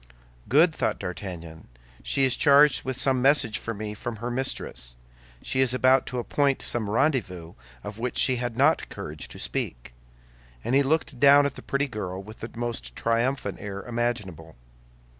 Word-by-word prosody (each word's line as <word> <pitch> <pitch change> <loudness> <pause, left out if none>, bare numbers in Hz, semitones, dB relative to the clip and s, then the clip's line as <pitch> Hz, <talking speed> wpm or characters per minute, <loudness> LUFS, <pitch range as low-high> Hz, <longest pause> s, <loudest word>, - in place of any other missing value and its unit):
"Good!" 160 +6 +5
thought - - -1
D'Artagnan, 85 -3 -7 0.3
"She 135 - 0
is 130 -1 +3
charged 145 -1 +5
with 130 -1 -3
some 130 -1 +2
message 135 -5 +3
for 115 - -5
me 105 -1 -5
from 120 +2 -6
her 120 +3 -5
mistress; 120 - -3 0.5
she 130 - -2
is 130 -1 +3
about 130 +1 +3
to 125 - -4
appoint 135 +3 0
some 110 -4 -1
rendezvous 105 - 0 0.3
of 105 +1 -7
which 125 +1 -3
she 130 -2 +3
had 120 -1 -4
not 150 +5 +3
courage 75 0 -7
to - - -10
speak." - - -4 0.7
And 120 - -2
he 140 - +5
looked 140 -2 -1
down 140 +1 +7
at 140 - -1
the - - -10
pretty 140 +1 -1
girl 95 -6 -5
with 110 +2 -12
the 115 - -6
most 115 - -4
triumphant 120 +4 -1
air 100 -1 -6
imaginable. 105 -10 -3
120 Hz, 170 wpm, -26 LUFS, 105-135 Hz, 0.7 s, down